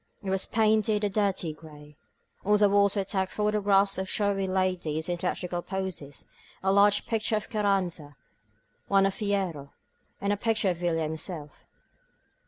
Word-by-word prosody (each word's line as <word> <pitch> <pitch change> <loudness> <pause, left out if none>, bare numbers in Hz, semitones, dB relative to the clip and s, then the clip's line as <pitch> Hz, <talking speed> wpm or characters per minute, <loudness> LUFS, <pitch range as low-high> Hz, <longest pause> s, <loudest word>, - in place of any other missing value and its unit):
It 190 - -2
was 190 0 0
painted 215 -1 +2
a 205 - +1
dirty 195 -5 0
gray. 150 -1 -14 0.5
On 210 +2 +4
the 205 0 +5
walls 200 0 +3
were 200 - +1
tacked 190 -1 -2
photographs 205 -2 +2
of 190 0 -3
showy 200 -2 0
ladies 185 -5 -1
in 175 -1 -1
theathrical 180 0 -3
poses, 190 -8 -5 0.4
a 190 0 +3
large 205 +1 +4
picture 225 -1 0
of 215 - -4
Carranza, 190 -8 -1 0.7
one 195 -1 +4
of 195 - +1
Fierro, 190 -10 -2 0.5
and 200 +1 0
a - - -2
pic 225 +1 0
ture 195 -3 +2
of 175 - -4
Villa 170 -2 0
himself. 155 -1 -5
195 Hz, 160 wpm, -27 LUFS, 175-205 Hz, 0.7 s, the